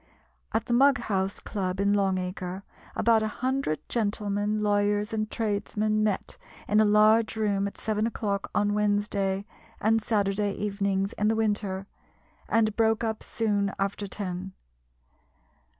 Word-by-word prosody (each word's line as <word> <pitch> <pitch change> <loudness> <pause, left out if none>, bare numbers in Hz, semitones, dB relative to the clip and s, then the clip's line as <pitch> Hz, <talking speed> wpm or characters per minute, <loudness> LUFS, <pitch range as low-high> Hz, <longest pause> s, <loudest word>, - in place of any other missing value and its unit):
At 225 - 0
the 240 - -1
Mughouse 235 -7 +2
Club 190 -2 -3
in 200 +1 +3
Long 195 -2 +2
Acre, 180 +1 -4 0.3
about 230 -1 +4
a 215 - 0
hundred 255 - -2
gentlemen, 210 -1 0
lawyers, 205 +1 +1
and 215 -1 -1
tradesmen 215 -1 0
met 210 -3 -1 0.3
in 210 - +3
a 215 - +6
large 215 +2 +4
room, 200 -2 +1
at 200 - -8
seven 215 0 0
o'clock 200 -4 -2
on 205 0 +2
Wednesday 205 -2 0 0.3
and 225 +1 +2
Saturday 205 -1 0
evenings 200 -1 -1
in 210 - 0
the 220 - +2
winter, 205 -3 -1 0.6
and 220 -2 +2
broke 225 0 +2
up 220 -1 -2
soon 205 -3 -1
after 200 +1 -2
ten. 190 -1 -5
205 Hz, 135 wpm, -27 LUFS, 200-220 Hz, 0.6 s, a